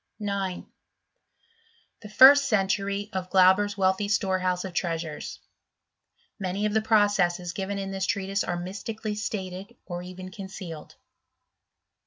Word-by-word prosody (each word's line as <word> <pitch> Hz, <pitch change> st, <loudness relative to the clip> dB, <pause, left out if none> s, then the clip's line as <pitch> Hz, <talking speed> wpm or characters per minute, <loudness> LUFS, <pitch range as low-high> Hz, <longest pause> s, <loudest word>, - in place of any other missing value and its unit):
9. 200 Hz, -3 st, -3 dB, 1.4 s
The 210 Hz, -, -10 dB
first 275 Hz, +6 st, +8 dB
century 200 Hz, 0 st, 0 dB
of 185 Hz, -1 st, -3 dB
Glauber's 190 Hz, +2 st, +4 dB
wealthy 190 Hz, +1 st, +1 dB
Storehouse 185 Hz, -3 st, 0 dB
of 185 Hz, -, -6 dB
Treasures. 165 Hz, -3 st, -3 dB, 0.5 s
— 205 Hz, -, -18 dB
^Many 190 Hz, +3 st, -1 dB
of 210 Hz, -, 0 dB
the 220 Hz, -, +3 dB
processes 195 Hz, -5 st, +2 dB
given 200 Hz, +1 st, -3 dB
in 195 Hz, -1 st, -4 dB
this 190 Hz, 0 st, -2 dB
treatise 195 Hz, 0 st, -1 dB
are 175 Hz, -, -2 dB
mystically 210 Hz, +4 st, -5 dB
stated, 200 Hz, 0 st, -5 dB
or 175 Hz, -1 st, -5 dB
even 185 Hz, +1 st, -9 dB
concealed. 185 Hz, -5 st, -9 dB
195 Hz, 125 wpm, -26 LUFS, 185-205 Hz, 1.4 s, first